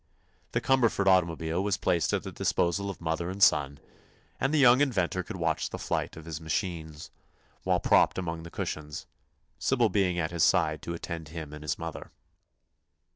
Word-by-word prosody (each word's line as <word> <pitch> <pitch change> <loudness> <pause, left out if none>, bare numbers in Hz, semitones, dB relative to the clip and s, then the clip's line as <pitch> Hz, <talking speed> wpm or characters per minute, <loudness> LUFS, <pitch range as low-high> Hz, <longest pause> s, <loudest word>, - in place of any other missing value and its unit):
The - - +1
Cumberford 120 -6 +2
automobile 85 -2 +2
was 100 -1 0
placed 85 -3 +1
at - - 0
the - - -6
disposal 100 +3 0
of 95 - -7
mother 85 +1 -2
and 95 - -5
son, 70 -2 +4 0.6
and 135 - +1
the 155 - +2
young 130 -1 +6
inventor 95 -10 +1
could 90 - -7
watch 80 -3 -1
the - - -5
flight - - -3
of 80 - -10
his 80 -1 -6
machine 80 -1 -3 0.7
while - - +2
propped - - +3
among 85 -3 -3
the 85 - -9
cushions, 75 -3 -5 0.5
Sybil 120 -4 +2
being 95 -4 +1
at 85 0 -1
his 85 -1 -2
side - - +3
to 85 - -5
attend 85 -1 -6
him 80 -2 -7
and 75 - -8
his 75 - -2
mother. - - -7
85 Hz, 180 wpm, -28 LUFS, 80-95 Hz, 0.7 s, young